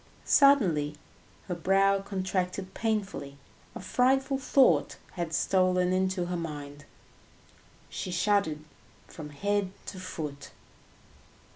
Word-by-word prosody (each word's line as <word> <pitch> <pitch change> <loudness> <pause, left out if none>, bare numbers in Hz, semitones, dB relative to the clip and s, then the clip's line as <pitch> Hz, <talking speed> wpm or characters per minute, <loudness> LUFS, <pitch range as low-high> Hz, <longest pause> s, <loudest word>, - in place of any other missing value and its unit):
Suddenly 180 - +4 0.5
her 180 - -2
brow 195 +3 +2
contracted 190 -1 -3
painfully, 205 -11 -3 0.4
a - - -6
frightful 265 +2 +1
thought 265 0 +3
had 170 -3 -4
stolen 185 +1 +2
into 185 -1 0
her 175 0 -3
mind, 145 -3 -6 1.0
she - - -5
shuddered 180 -4 +1 0.4
from 150 -2 -9
head 200 +6 -1 0.2
to 185 - -7
foot. 150 -6 -6
185 Hz, 100 wpm, -28 LUFS, 165-200 Hz, 1.0 s, Suddenly